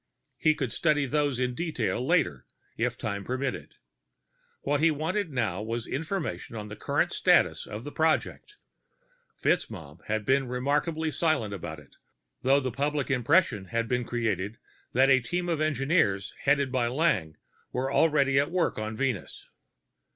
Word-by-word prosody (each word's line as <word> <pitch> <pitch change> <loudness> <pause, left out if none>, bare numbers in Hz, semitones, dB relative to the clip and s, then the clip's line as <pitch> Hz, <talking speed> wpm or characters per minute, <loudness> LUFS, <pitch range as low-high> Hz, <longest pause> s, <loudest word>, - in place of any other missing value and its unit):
He 155 0 +4
could 130 -6 -2
study 150 -3 +2
those 145 -2 0
in 125 -1 0
detail 125 -6 -2
later, 135 - +1 0.3
if - - -1
time 100 -2 -3
permitted. 130 +4 -3 0.9
What 145 +1 0
he 165 - +5
wanted 165 +5 -1
now 110 -8 -1
was 115 +2 -3
information 160 -4 -4
on 105 -1 -6
the 105 - -7
current - - 0
status - - +3
of 105 +2 -6
the 145 - -7
project; 160 - 0 0.9
FitzMaugham 85 - -1
had 110 -1 -1
been 135 +1 +2
remarkably 150 +6 0
silent 145 -11 0
about 85 -5 -6
it, 75 - -19 0.4
though 135 +2 +4
the 130 -2 -2
public 145 +2 -1
impression 130 - +2
had 115 +3 -1
been 125 +1 0
created 110 -4 -2 0.4
that 135 +2 +5
a 130 - +6
team 175 +9 -2
of 165 -3 0
engineers 135 - +1
headed 140 -1 +3
by 125 -2 +1
Lang 120 - 0 0.3
was 130 +2 -1
already 140 -4 +4
at 140 - +1
work 175 -9 0
on 110 0 -4
Venus. 125 -7 -3
130 Hz, 150 wpm, -28 LUFS, 110-150 Hz, 0.9 s, a